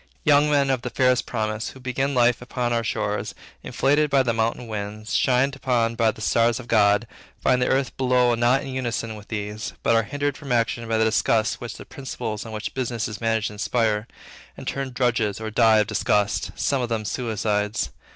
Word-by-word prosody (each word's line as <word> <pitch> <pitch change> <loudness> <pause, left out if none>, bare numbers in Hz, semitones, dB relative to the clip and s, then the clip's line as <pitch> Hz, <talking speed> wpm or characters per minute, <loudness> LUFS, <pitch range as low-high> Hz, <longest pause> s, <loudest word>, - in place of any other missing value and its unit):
Young 150 0 +4
men 140 -2 +3
of 130 -2 0
the 125 - -4
fairest 125 0 +2
promise, 110 -1 -2
who 130 - -13
begin 130 +2 -2
life 120 -1 +3
upon 125 -1 -2
our 115 -1 0
shores, 110 - -2 0.3
inflated 145 +2 +1
by 135 -1 +4
the 120 -2 0
mountain 115 +2 -1
winds, 105 0 -5
shined 135 +2 +2
upon 120 -4 0
by 115 -1 +1
all - - +4
the 110 - -13
stars 115 +2 +2
of 125 - -10
God, 105 -1 +4 0.3
find 125 - +2
the 125 - +2
earth 135 0 0
below 125 -2 +3
not 120 +4 +2
in - - -6
unison 120 -3 -3
with 105 0 -12
these, 105 0 -4
but - - +3
are 115 - +5
hindered 145 +5 -2
from 140 -4 -8
action 115 0 0
by 115 0 +1
the 110 - +3
disgust 110 0 +1
which 120 - -6
the - - -10
principles 120 -5 -5
on - - -8
which 110 0 -5
business 120 -3 -2
is 105 0 -7
managed 115 -1 0
inspire, 105 +1 0 0.5
and - - -9
turn 135 -1 -2
drudges, 120 -5 0
or 110 0 -5
die 110 0 +5
of 105 - +3
disgust, 105 -1 0
some 140 -2 0
of 120 - -2
them 110 -2 -2
suicides. 105 -1 -1
115 Hz, 205 wpm, -24 LUFS, 110-130 Hz, 0.5 s, are